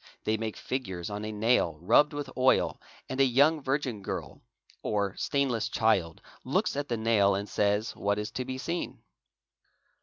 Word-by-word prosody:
_ - - -30 0.2
they 110 - +1
make 110 -1 -4
figures 95 -9 -4
on 105 +1 -4
a 110 - -4
nail 105 -6 +2
rubbed 120 - +4
with 145 -1 -4
oil 130 0 +2 0.3
and 130 +1 -1
a - - +7
young 140 +5 +4
virgin 135 -5 -1
girl - - -5 0.4
or 100 -2 -1
stainless 130 -6 0
child 95 -8 +1 0.2
looks - - 0
at 145 0 -2
the 120 - 0
nail 110 -3 +3
and 100 +1 -3
says 105 +2 0
what 100 0 0
is 105 +1 -3
to 130 - -3
be 130 +1 -5
seen." 170 +6 -4
110 Hz, 175 wpm, -29 LUFS, 100-130 Hz, 0.4 s, a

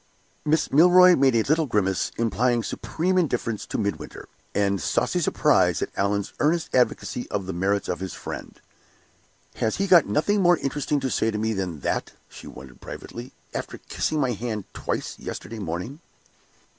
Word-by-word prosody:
Miss 155 +1 +1
Milroy 180 +4 +7
made 135 -4 +3
a 115 - +3
little 155 +3 +1
grimace, 95 -5 0
implying 115 +1 +1
supreme 185 +10 -1
indifference 120 - -1
to - - -3
Midwinter, 100 -2 -4 0.3
and 100 -2 +1
saucy - - 0
surprise - - +3
at - - -5
Allan's 100 0 -1
earnest 160 +2 +1
advocacy 125 -1 0
of 100 -2 -2
the 95 - -4
merits 95 +3 0
of 90 - -2
his 95 0 -5
friend. - - -8 1.0
"Has 110 - 0
he 195 - 0
got 180 -5 +6
nothing 205 +7 +1
more 175 -1 +5
interesting 145 +1 -1
to 130 -1 -2
say 110 - +1
to 105 - -2
me 110 +1 0
than 90 -7 -4
that," - - -2 0.2
she - - -12
wondered, 65 0 -12
privately, 120 +2 -8 0.2
"after - - -5
kissing 155 - -2
my 130 -3 +1
hand 110 -2 -3
twice - - -4
yesterday 115 0 -7
morning?" 95 - -5
115 Hz, 165 wpm, -24 LUFS, 100-150 Hz, 1.0 s, Milroy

